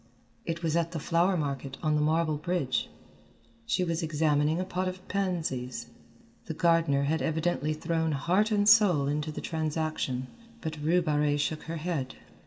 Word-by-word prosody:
It 170 Hz, +1 st, -3 dB
was 160 Hz, -1 st, +1 dB
at 170 Hz, 0 st, 0 dB
the 165 Hz, -, -2 dB
flower 175 Hz, +4 st, +2 dB
market 140 Hz, -3 st, -3 dB
on 155 Hz, -1 st, +2 dB
the 150 Hz, -, +2 dB
marble 155 Hz, 0 st, +1 dB
bridge. 150 Hz, -5 st, -1 dB, 0.8 s
She 185 Hz, -, +1 dB
was 165 Hz, -1 st, -1 dB
examining 155 Hz, 0 st, +1 dB
a 185 Hz, -, -1 dB
pot 185 Hz, 0 st, -2 dB
of 185 Hz, 0 st, -6 dB
pansies. 165 Hz, -11 st, -2 dB, 0.6 s
The -, -, -4 dB
gardener 165 Hz, -5 st, +3 dB
had 155 Hz, +3 st, 0 dB
evidently 160 Hz, -1 st, 0 dB
thrown 160 Hz, 0 st, -1 dB
heart 180 Hz, +9 st, +2 dB
and 205 Hz, -2 st, +2 dB
soul 200 Hz, -10 st, +6 dB
into 150 Hz, +2 st, -1 dB
the -, -, -6 dB
transaction, 155 Hz, -5 st, -2 dB, 0.3 s
but 155 Hz, -5 st, -5 dB
Rue 170 Hz, +4 st, +3 dB
Barrée 150 Hz, -2 st, +1 dB
shook 155 Hz, +1 st, -1 dB
her 165 Hz, +1 st, -4 dB
head. 155 Hz, -5 st, -3 dB
160 Hz, 165 wpm, -29 LUFS, 150-175 Hz, 0.8 s, soul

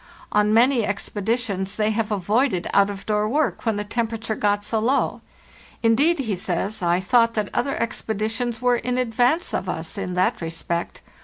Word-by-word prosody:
On 210 Hz, 0 st, +3 dB
many 240 Hz, +2 st, +4 dB
ex 205 Hz, -1 st, -2 dB
peditions 205 Hz, -2 st, -2 dB
they 215 Hz, 0 st, +1 dB
have 220 Hz, 0 st, -1 dB
avoided 205 Hz, 0 st, +1 dB
out 200 Hz, 0 st, +4 dB
of 200 Hz, -1 st, -7 dB
door 210 Hz, 0 st, +1 dB
work 290 Hz, -2 st, 0 dB
when 220 Hz, -, +2 dB
the 205 Hz, -, -2 dB
temperature 225 Hz, 0 st, -2 dB
got 205 Hz, -1 st, 0 dB
so 220 Hz, +1 st, -1 dB
low. 250 Hz, +6 st, +1 dB, 0.6 s
'Indeed,' 280 Hz, +10 st, +4 dB
he 220 Hz, -6 st, -1 dB
says, 185 Hz, +4 st, -2 dB
'I 175 Hz, 0 st, +2 dB
thought 230 Hz, +3 st, +3 dB
that 210 Hz, -2 st, -1 dB
other 275 Hz, -, -1 dB
expeditions 225 Hz, +2 st, -2 dB
were 245 Hz, -1 st, +4 dB
in 250 Hz, +1 st, -2 dB
advance 250 Hz, +6 st, +1 dB
of 185 Hz, 0 st, -2 dB
us 160 Hz, +4 st, -4 dB
in 180 Hz, -2 st, -3 dB
that 185 Hz, +5 st, +1 dB
respect. 165 Hz, +1 st, -4 dB
220 Hz, 175 wpm, -23 LUFS, 200-235 Hz, 0.6 s, many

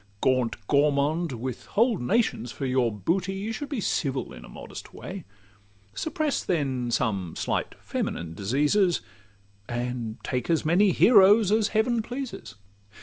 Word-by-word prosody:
Gaunt 130 Hz, -1 st, +2 dB
Gourmand! 150 Hz, +3 st, +2 dB
with 125 Hz, +1 st, -5 dB
whole 230 Hz, -2 st, +4 dB
nations 125 Hz, -, 0 dB
for 135 Hz, -, -5 dB
your 125 Hz, -2 st, +2 dB
booty, 180 Hz, -, -1 dB
You 205 Hz, +4 st, -3 dB
should 290 Hz, +5 st, -5 dB
be 280 Hz, -5 st, -2 dB
civil 135 Hz, -9 st, -1 dB
in -, -, -11 dB
a -, -, -12 dB
modest -, -, -10 dB
way: 185 Hz, -3 st, -7 dB, 0.7 s
Suppress, 310 Hz, -3 st, -1 dB
then, 135 Hz, -7 st, -1 dB
some 100 Hz, -7 st, -1 dB
slight -, -, -2 dB
feminine 80 Hz, -1 st, -4 dB
diseases, 145 Hz, -, +2 dB, 0.7 s
And 120 Hz, -2 st, -3 dB
take 125 Hz, +3 st, -2 dB
as 165 Hz, -2 st, +1 dB
many 185 Hz, +5 st, +4 dB
heroes 205 Hz, 0 st, +6 dB
as 215 Hz, -1 st, +3 dB
Heaven 225 Hz, +2 st, +1 dB
pleases. 245 Hz, -, -6 dB
150 Hz, 140 wpm, -26 LUFS, -, 0.7 s, heroes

